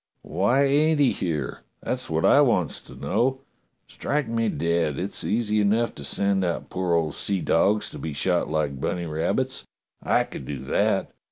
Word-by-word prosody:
"Why, 100 - +2
ain't 150 +3 +3
he 140 -3 +4
here.'^ 80 -6 -3 0.2
That's - - -2
wot - - 0
I - - +6
wants - - +1
to - - -13
know. 130 +2 0 0.5
Strike 145 -3 -2
me 115 -1 0
dead! 85 -5 0
it's 95 +3 -3
easy 105 -1 +1
enough 110 +3 +2
to 70 - -9
send 95 +7 +1
out 85 -2 -3
poor 90 -2 0
old 80 -3 0
seadogs 100 +2 +1
to - - -8
be 80 - -4
shot 70 +1 0
like 75 -3 -1
bunny 85 -1 -2
rabbits. 80 0 -1 0.4
I - - +2
could 65 - -9
do 75 - -4
that. - - 0
95 Hz, 170 wpm, -25 LUFS, 80-115 Hz, 0.5 s, I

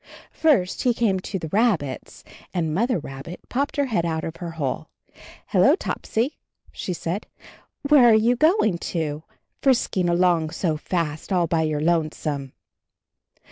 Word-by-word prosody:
First 260 - +2
he 245 -2 +2
came 205 -6 +1
to 190 +2 -4
the 165 - -5
rabbits 195 - 0 0.3
and 160 -3 0
Mother 235 +7 +1
Rabbit 140 +3 -8
popped 280 +3 -1
her 285 - +2
head 220 -10 0
out 160 -1 -2
of 165 - -5
her 175 - -5
hole. 140 -5 -3 0.6
"Hello, - - +5
Topsy," 245 +7 -2 0.3
said 180 +2 -4
she. - - -26 0.4
"Where 280 -5 +7
are 220 - +6
you 230 +3 +3
going 275 - +3
to, 155 -4 -3 0.4
frisking 230 -9 +2
along 170 -2 +2
so 160 0 -1
fast, 155 +1 -3
all 180 -2 +3
by 165 0 +1
your 155 -2 -1
lonesome?" 155 -4 -1
175 Hz, 145 wpm, -23 LUFS, 160-230 Hz, 0.6 s, Where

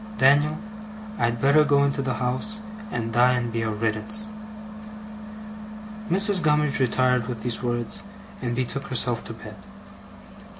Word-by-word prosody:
Dan'l, 145 +2 +4 0.6
I'd 115 0 0
better 140 +4 +4
go 140 -1 +3
into 140 -1 0
the 130 -3 -2
house, 125 - -2 0.3
and 115 -1 -3
die 125 +2 +4
and 120 -2 -2
be 115 - -1
a 110 - -1
riddance!' 110 - -2 1.8
Mrs. 195 +1 +6
Gummidge 150 -3 +1
retired 125 -2 +1
with 120 -4 -6
these 120 -2 -3
words, 120 -1 -3 0.4
and 120 -2 -2
betook 130 +2 -3
herself 120 -2 +2
to - - -5
bed. - - -11
125 Hz, 135 wpm, -24 LUFS, 120-145 Hz, 1.8 s, Mrs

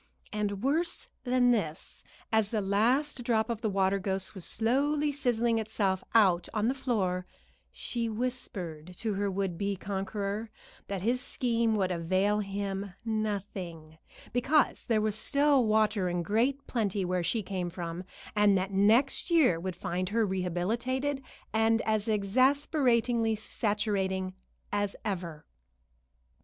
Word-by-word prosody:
And 205 -1 -2
worse 320 +6 0 0.2
than 250 0 +4
this, 180 -8 -2 0.3
as 220 -2 +2
the 220 - 0
last 245 +8 +1
drop 225 -1 +1
of 230 -1 -4
the 220 - 0
water 195 0 +2
ghost 190 0 -2
was 190 -4 -7
slowly 285 +6 +1
sizzling 240 -4 +1
itself 200 -4 -1
out 185 -6 +4
on 215 +1 +2
the 255 - +2
floor, 195 -9 -1 0.4
she 235 -2 -3
whispered 185 -8 -4
to 220 -2 -2
her 200 +1 0
would 190 -3 -2
be 200 0 0
conqueror 200 +3 -3 0.4
that 195 -2 -4
his 245 +3 +1
scheme 235 -3 +1
would 190 -3 +1
avail 185 +5 +1
him 195 -1 -4
nothing, 190 -7 -4 0.3
because 270 +5 +2
there 220 -2 +2
was 215 -1 +1
still 280 +2 +3
water 215 -3 +2
in 175 0 -1
great 250 - +1
plenty 205 -5 -1
where 180 0 0
she 220 +5 0
came 180 -2 -3
from, 170 0 -5 0.3
and 205 -1 +5
that 190 +1 -2
next 220 - +4
year 300 - +4
would 185 +1 -4
find 185 +1 -2
her 225 +1 +2
rehabilitated 225 +10 -1 0.3
and 225 +1 +3
as 215 -1 0
exasperatingly 235 +1 +2
saturating 205 -3 -1 0.4
as 205 -1 0
ever. 175 -7 -4
210 Hz, 135 wpm, -30 LUFS, 190-235 Hz, 0.4 s, and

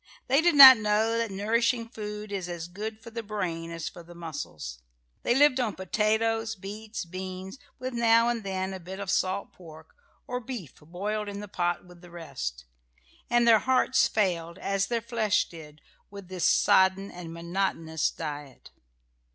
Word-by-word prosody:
They 275 +4 +3
did 345 -1 +3
not 265 -3 +12
know 215 +1 +1
that 230 -1 -1
nourishing 230 +4 0
food 210 -2 -7
is 190 -3 -4
as 170 -1 -5
good 215 +4 -7
for 230 - -10
the 230 0 -4
brain 180 -6 -4
as 165 -1 -5
for 175 - -8
the 170 +1 -14
muscles. 80 - -7 0.4
They 240 - +1
lived 275 -1 +5
on 225 -6 -1
potatoes, 220 +3 0
beets, 210 +2 -7
beans, 185 +5 -7 0.2
with 255 0 -5
now 230 0 +4
and 235 -2 -1
then 190 -1 -3
a 190 - -6
bit 185 +2 -8
of 200 -2 -3
salt 190 +2 -1
pork 160 -3 -14 0.3
or 250 0 -3
beef 235 - -8
boiled 205 +7 -4
in 200 0 -6
the 210 - -7
pot 175 -2 -2
with 180 -1 -16
the 175 - -14
rest; 65 - -6 0.6
and 240 0 +3
their 225 -2 +7
hearts 260 +1 +3
failed, 175 -5 -1
as 195 0 -1
their 235 0 -1
flesh 225 -3 +1
did, 155 -2 -13 0.3
with 200 -2 -11
this 185 -2 -2
sodden 195 -1 +4
and 175 -2 -8
monotonous 170 -2 -1
diet. 145 -4 -8
195 Hz, 170 wpm, -27 LUFS, 175-225 Hz, 0.6 s, not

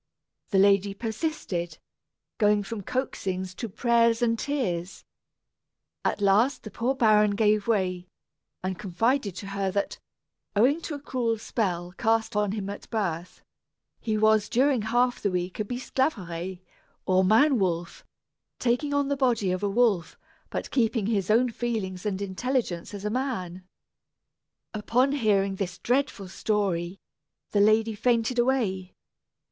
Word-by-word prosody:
The 195 - +1
lady 200 0 +4
persisted, 210 - -3 0.6
going 210 -1 +3
from 210 +1 -5
coaxings 190 -6 -3
to 230 +4 -5
prayers 235 +2 +2
and 230 -1 +1
tears. 195 - -3 1.0
At - - -1
last 210 +8 +3
the 215 - -8
poor 245 +7 -1
baron 210 -4 +4
gave 210 -1 +2
way, 185 -5 0 0.6
and 185 -1 -3
confided 210 +2 0
to 195 - -7
her 195 -1 -1
that, 200 +1 -2 0.6
owing 265 +10 +3
to 315 - -5
a - - -6
cruel 245 -5 -1
spell 180 -6 -2
cast 225 0 +1
on 210 -1 +1
him 205 -3 -4
at 200 0 -7
birth, 180 -6 -3 0.6
he 215 -2 -1
was 215 -1 +3
during 265 0 +3
half 245 +3 +1
the 200 - +1
week 180 +1 -3
a - - +1
Bisclaveret, 190 - -3 0.4
or 185 0 +3
Man 230 +7 +4
Wolf, 175 -3 -2 0.5
taking 255 +4 0
on 285 -1 +1
the 280 - 0
body 240 -8 +1
of 185 - -2
a 205 - 0
wolf, 200 -6 +1 0.3
but - - -4
keeping 230 -4 +1
his 205 -3 0
own 235 +3 +4
feelings 215 -5 -3
and 200 -1 -2
intelligence 200 -2 -2
as 200 0 -7
a 210 - -1
man. 190 -9 -3 1.1
Upon 235 +6 +1
hearing 200 -7 +1
this 185 -1 -3
dreadful 245 -6 -1
story, 190 -3 -1 0.5
the 205 - +3
lady 215 +2 +4
fainted 235 +2 +1
away. 220 -8 0
210 Hz, 140 wpm, -26 LUFS, 190-240 Hz, 1.1 s, lady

